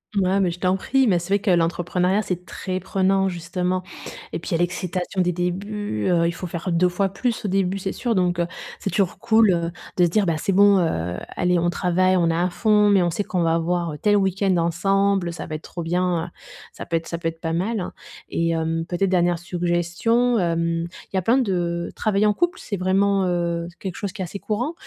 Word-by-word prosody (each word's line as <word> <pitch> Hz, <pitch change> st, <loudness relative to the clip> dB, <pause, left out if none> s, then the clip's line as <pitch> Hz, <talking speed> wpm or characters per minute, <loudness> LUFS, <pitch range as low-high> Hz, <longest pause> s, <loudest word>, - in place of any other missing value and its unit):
Mouais, 195 Hz, 0 st, +2 dB
mais 185 Hz, -3 st, +2 dB
je 170 Hz, +1 st, -6 dB
t'en 185 Hz, 0 st, +2 dB
prie, 265 Hz, +7 st, +1 dB
mais 185 Hz, -7 st, +3 dB
c'est 190 Hz, +4 st, 0 dB
vrai -, -, +1 dB
que 200 Hz, -1 st, +1 dB
l'entrepreneuriat, 180 Hz, +3 st, +1 dB
c'est 180 Hz, -1 st, -3 dB
très 185 Hz, 0 st, -4 dB
prenant 190 Hz, +1 st, +1 dB
justement, 180 Hz, +1 st, -2 dB, 0.5 s
et -, -, -2 dB
puis -, -, -8 dB
il -, -, -7 dB
y -, -, +3 dB
a -, -, +2 dB
l'excitation 180 Hz, +1 st, -2 dB
des 180 Hz, -, +2 dB
débuts, 180 Hz, -, -2 dB
heu, 170 Hz, -1 st, +3 dB
il -, -, 0 dB
faut 175 Hz, +1 st, -6 dB
faire 170 Hz, +2 st, -4 dB
2 180 Hz, +2 st, +3 dB
fois 195 Hz, +2 st, 0 dB
plus 225 Hz, +3 st, -2 dB
au -, -, +1 dB
début 190 Hz, 0 st, 0 dB
c'est 190 Hz, 0 st, -3 dB
sûr, 235 Hz, -3 st, -1 dB
donc 180 Hz, -2 st, +1 dB
heu, 170 Hz, -, +1 dB, 0.3 s
c'est -, -, -3 dB
toujours 195 Hz, -2 st, 0 dB
cool, 220 Hz, -2 st, +4 dB
heu, 170 Hz, -1 st, 0 dB, 0.3 s
de 180 Hz, -, +5 dB
se 170 Hz, -, +1 dB
dire: 205 Hz, +3 st, +2 dB
«Bah, 165 Hz, -3 st, 0 dB
c'est 195 Hz, -, -1 dB
bon, 200 Hz, +1 st, +6 dB
heu, 90 Hz, -, -1 dB, 0.2 s
allez 180 Hz, -1 st, +2 dB
on 175 Hz, -, +1 dB
travaille, 185 Hz, +1 st, +2 dB
on 170 Hz, -2 st, +2 dB
est -, -, 0 dB
à 180 Hz, +2 st, +1 dB
fond, 210 Hz, +2 st, +3 dB
mais 195 Hz, -3 st, +4 dB
on 175 Hz, -, +1 dB
sait 205 Hz, -, -1 dB
qu'on 180 Hz, -3 st, -1 dB
va 165 Hz, 0 st, +2 dB
avoir, 170 Hz, 0 st, 0 dB
heu, 150 Hz, -, -7 dB
tel 205 Hz, -1 st, +3 dB
week-end 195 Hz, -1 st, +1 dB
ensemble. 190 Hz, +2 st, +1 dB
Ça 170 Hz, -, -6 dB
va 155 Hz, -, -7 dB
être 155 Hz, -, -4 dB
trop 170 Hz, -, -7 dB
bien, 175 Hz, 0 st, 0 dB
heu». -, -, -7 dB, 0.5 s
Ça -, -, -8 dB
peut 165 Hz, -, -1 dB
être 165 Hz, -, -2 dB
ça 170 Hz, -, -4 dB
peut 165 Hz, -, -2 dB
être 165 Hz, 0 st, -4 dB
pas 165 Hz, 0 st, -3 dB
mal, 190 Hz, +3 st, -1 dB, 0.4 s
et 165 Hz, 0 st, 0 dB
hem, 165 Hz, 0 st, -1 dB
peut-être 185 Hz, +2 st, 0 dB
dernière 175 Hz, -1 st, +2 dB
suggestion, 175 Hz, +8 st, 0 dB
hem, 165 Hz, -1 st, 0 dB, 0.3 s
il -, -, -4 dB
y -, -, +3 dB
a 185 Hz, -, +2 dB
plein 235 Hz, +8 st, +3 dB
de 175 Hz, -7 st, -1 dB
travailler 210 Hz, -1 st, +1 dB
en 210 Hz, -, +4 dB
couple 350 Hz, -, 0 dB
c'est 200 Hz, -, -4 dB
vraiment, 195 Hz, +1 st, +2 dB
heu, 170 Hz, -1 st, -1 dB
c'est 170 Hz, -, -20 dB
quelque 190 Hz, -2 st, -6 dB
chose 200 Hz, -2 st, -4 dB
qui 195 Hz, -2 st, -5 dB
est -, -, -3 dB
assez 200 Hz, +3 st, -7 dB
courant. 245 Hz, +11 st, -2 dB
180 Hz, 245 wpm, -23 LUFS, 170-195 Hz, 0.5 s, bon